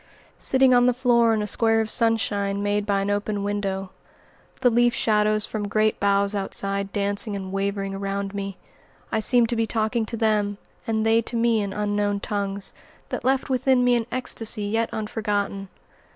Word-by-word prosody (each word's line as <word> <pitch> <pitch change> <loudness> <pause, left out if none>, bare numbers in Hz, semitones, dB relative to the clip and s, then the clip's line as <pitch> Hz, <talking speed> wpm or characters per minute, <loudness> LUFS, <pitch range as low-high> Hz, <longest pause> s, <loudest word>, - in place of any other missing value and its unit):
Sitting 265 -1 +3
on 245 0 +5
the 250 - +2
floor 240 -2 +3
in 215 -1 +1
a - - -3
square 225 0 +2
of 220 - 0
sunshine 205 -4 +1
made 205 0 0
by 200 -1 +1
an 200 +1 -1
open 205 0 -2
window, 195 -2 -2 0.7
the 245 - +4
leaf 240 +1 +3
shadows 215 -1 +2
from 210 -2 -4
great 215 +1 +1
boughs 200 0 +2
outside 200 0 -2
dancing 205 +1 -2
and 190 -1 -5
wavering 195 0 -2
around 195 0 -3
me, 195 -1 -5 0.5
I 220 - +1
seemed 235 +1 +3
to 240 - 0
be 225 -1 0
talking 220 +1 -1
to 230 - -5
them 210 -2 +1 0.3
and 220 -1 0
they 225 +1 +4
to 235 - -5
me 230 -1 +2
in 200 -1 -3
unknown 205 0 -1
tongues, 200 -1 -3 0.4
that - - -4
left 265 +1 +1
within 260 0 +3
me 245 0 +4
an 235 -1 0
ecstasy 225 -4 -2
yet 225 +3 0
unforgotten. 205 -2 -2
210 Hz, 180 wpm, -24 LUFS, 200-230 Hz, 0.7 s, on